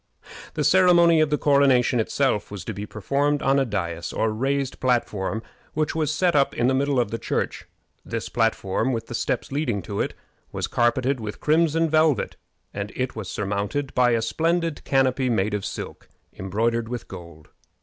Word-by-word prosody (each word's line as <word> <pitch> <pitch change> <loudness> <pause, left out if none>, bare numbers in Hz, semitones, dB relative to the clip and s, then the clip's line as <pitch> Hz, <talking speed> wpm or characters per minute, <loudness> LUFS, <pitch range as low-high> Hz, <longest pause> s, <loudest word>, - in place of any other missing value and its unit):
The - - 0
ceremony 170 -3 +5
of 155 - +2
the 150 - +1
coronation 135 -4 +3
itself 115 -1 0
was 100 -4 -7
to 110 - -4
be 100 +1 -6
performed 140 +8 0
on 135 +1 +3
a 135 - +2
dais, 85 -7 -3
or 110 - 0
raised 135 +4 -1
platform, 110 -4 0 0.3
which 155 -1 0
was 155 -2 0
set 170 +2 +1
up 140 -1 +2
in 120 - +1
the 130 - +3
middle 140 0 +1
of 120 -4 0
the 115 - -3
church. - - -3 0.4
This - - -4
platform, 115 +1 0
with 115 -1 -3
the - - -8
steps 120 - -2
leading 125 - -1
to 100 +4 -5
it, - - -3 0.4
was - - -2
carpeted 125 +3 +1
with 105 -2 -6
crimson 165 +1 +2
velvet, 155 -4 +2 0.4
and 100 +1 -4
it 130 0 -2
was 110 -5 -6
surmounted 105 +8 -2
by 125 -1 +3
a 115 -1 +1
splendid 165 +5 0
canopy 130 -1 +2
made 105 -2 +1
of 105 -2 -2
silk, - - -7 0.2
embroidered 115 +4 -1
with 120 -1 -5
gold. 85 -4 -11
125 Hz, 180 wpm, -24 LUFS, 105-145 Hz, 0.4 s, ceremony